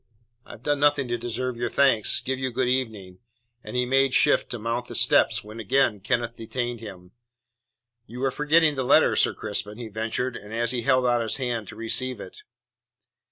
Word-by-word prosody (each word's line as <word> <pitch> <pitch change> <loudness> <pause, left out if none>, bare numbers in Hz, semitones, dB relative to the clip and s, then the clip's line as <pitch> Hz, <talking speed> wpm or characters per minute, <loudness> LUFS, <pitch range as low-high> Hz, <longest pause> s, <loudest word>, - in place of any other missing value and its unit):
"I - - -10
have 120 - -14
done 145 -1 0
nothing 145 -2 +2
to 120 - -1
deserve 120 +1 -3
your 120 0 -2
thanks. 130 -6 +3
Give 130 0 -3
you 130 -1 -1
good 125 +1 -1
evening." 110 -8 -3 0.4
And 105 - -8
he 125 0 +1
made 135 +1 +2
shift - - +4
to 120 - -4
mount 115 +2 -3
the - - -8
steps - - +3
when 110 +2 -10
again 115 0 +1
Kenneth 115 +4 -1
detained 120 +1 -4
him. 95 -5 -11 1.0
"You 125 +3 -7
are 135 - +1
forgetting 150 +3 +3
the 135 -2 -2
letter, - - +4
Sir - - +2
Crispin," 105 +1 -3
he 120 -2 -7
ventured, 115 +4 -2
and 105 - -10 0.2
he 125 -2 -2
held 130 0 +2
out 120 -1 +2
his 115 - -1
hand 120 -5 -3
to - - -10
receive 130 +3 -2
it. - - -11
120 Hz, 195 wpm, -25 LUFS, 110-130 Hz, 1.0 s, shift